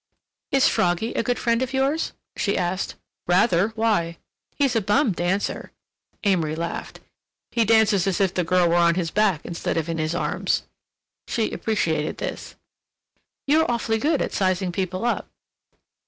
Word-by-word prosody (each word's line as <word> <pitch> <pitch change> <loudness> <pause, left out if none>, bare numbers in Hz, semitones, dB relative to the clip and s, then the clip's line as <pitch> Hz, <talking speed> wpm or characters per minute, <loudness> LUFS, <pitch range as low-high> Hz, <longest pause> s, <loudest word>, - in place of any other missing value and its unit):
"Is 275 -1 +4
Froggy 180 +6 +1
a - - 0
good 245 +1 -1
friend 235 0 +1
of 260 0 -2
yours?" 275 +4 0 0.2
she 200 - 0
asked. 180 +2 -2 0.3
"Rather—why?" 185 -1 +2 0.4
"He's 275 -4 +1
a 225 - +3
bum 210 +5 +2
dancer." 180 +3 -2 0.5
Amory 170 -6 +1
laughed. 170 +1 -5 0.5
"He 230 -1 +2
dances 215 -3 +4
as 190 - 0
if 190 -2 +2
the 180 - 0
girl 180 +1 +3
were 170 - +2
on 170 -1 +4
his 170 -3 -1
back 200 -6 +1
instead 170 -1 -3
of 160 -1 -1
in 165 -1 -2
his 155 +2 -1
arms." - - 0 0.6
She 225 -3 -1
appreciated 165 -9 -1
this. - - -6 0.9
"You're 310 +2 +3
awfully 230 -2 0
good 300 +4 +1
at - - -4
sizing 185 -1 0
people 185 +3 -2
up." 240 - -1
195 Hz, 155 wpm, -23 LUFS, 175-230 Hz, 0.9 s, Is